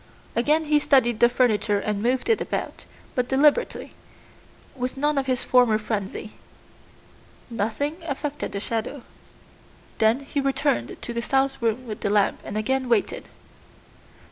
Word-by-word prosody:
Again 300 +7 +2
he 300 0 +3
studied 240 -6 +3
the 240 - +6
furniture 225 -4 +2
and 200 0 -2
moved 250 +3 0
it 455 - +2
about, - - -4 0.3
but 250 -2 0
deliberately, 295 - +2 0.8
with 255 0 -4
none 295 +2 +1
of 265 - -3
his 255 -1 0
former 245 -4 +4
frenzy. 215 -1 -4 1.2
Nothing 230 +8 -2
affected 290 0 -3
the 200 - -2
shadow. 230 +5 -3 1.0
Then 225 +4 +3
he 280 +1 -2
returned 275 - 0
to 240 - -5
the 235 - -2
south 270 +1 0
room 230 +2 0
with 215 -3 -6
the - - -1
lamp 205 -1 +2
and 210 - -5
again 260 +4 -1
waited. 230 -3 +1
250 Hz, 145 wpm, -24 LUFS, 220-275 Hz, 1.2 s, the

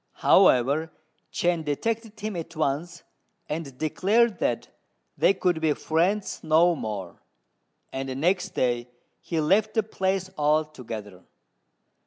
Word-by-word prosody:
However, 140 +6 +4 0.4
Chên 175 -2 0
detected 220 +9 -3
him 215 -1 -4
at 165 -1 -6
once, 160 +3 -2 0.4
and 150 -4 -5
declared 205 - +2
that 120 - -1 0.5
they - - +4
could 180 -3 0
be 155 -2 +3
friends 180 +8 0
no 165 +2 +4
more, 105 - -6 0.7
and 135 0 -3
next 180 +4 0
day 120 -1 0 0.3
he 165 - -2
left 200 +8 +2
the 220 - +3
place 190 -2 -2
altogether. 125 - -2
160 Hz, 115 wpm, -26 LUFS, 140-190 Hz, 0.7 s, However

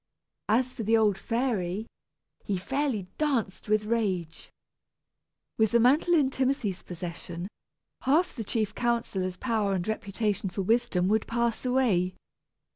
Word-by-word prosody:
As 250 +4 +2
for 235 - -6
the 225 +1 +3
old 210 -3 +3
fairy, 215 -3 -1 0.6
he 200 - -1
fairly 265 0 -1
danced 250 -11 -1
with 215 0 +2
rage. 195 -8 -1 1.1
With 220 -1 +3
the 235 - +6
mantle 290 +9 +4
in 280 -4 +3
Timothy's 260 -8 0
possession, 175 0 -6 0.5
half 310 +7 +2
the 230 - -4
chief 215 0 -1
counsellor's 215 -7 -1
power 215 -3 0
and 180 0 -2
reputation 210 -2 -1
for 195 +2 -3
wisdom 220 -4 +2
would 220 +1 +1
pass 235 +1 0
away. 210 -9 +2
220 Hz, 130 wpm, -28 LUFS, 190-245 Hz, 1.1 s, the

